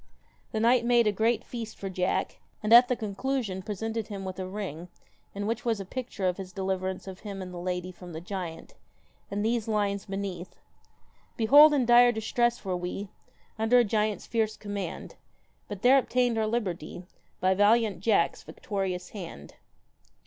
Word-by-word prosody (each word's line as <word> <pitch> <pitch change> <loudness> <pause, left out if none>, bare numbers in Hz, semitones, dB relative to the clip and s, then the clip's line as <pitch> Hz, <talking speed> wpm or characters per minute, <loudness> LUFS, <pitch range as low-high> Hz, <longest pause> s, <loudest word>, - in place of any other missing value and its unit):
The 220 - -1
knight 235 +2 +4
made 240 -1 +4
a 210 - +3
great 225 +3 +1
feast 230 -2 -7
for 195 - -5
Jack, 185 0 -1 0.2
and 215 +2 +3
at 245 +1 +9
the 250 - +1
conclusion 215 -2 -3
presented 220 +2 -4
him 195 -2 -6
with 185 0 -6
a 185 - -3
ring 185 -4 -6 0.5
in 205 0 -3
which 230 +2 -2
was 230 -3 0
a 195 - -5
picture 225 -3 -4
of 180 - 0
his 190 -2 -7
deliverance 190 -1 -3
of 190 -1 -8
him 200 -2 -7
and 185 -1 -7
the 175 - -6
lady 180 0 -3
from 180 0 -12
the 160 - -6
giant, 175 -2 -6 0.6
and 205 +1 -2
these 230 -1 0
lines 205 -2 -1
beneath: 195 -2 -5 0.4
' - - -37
Behold 290 +7 +8
in 275 -4 +2
dire 240 +1 +7
distress 240 +1 0
were 185 -1 -1
we, 180 +3 -4 0.5
Under 225 +3 +4
a 245 - +6
giant's 215 -1 -1
fierce 220 -2 -1
command; 205 -1 -6 0.5
But 205 -2 -7
there 260 +2 +7
obtained 250 -2 +1
our 220 -1 0
liberty 185 -7 -3 0.4
By 185 0 +3
valiant 205 -1 +3
Jack's 200 -3 +2
victorious 185 -3 -4
hand.' 170 - -9
205 Hz, 175 wpm, -28 LUFS, 185-230 Hz, 0.6 s, at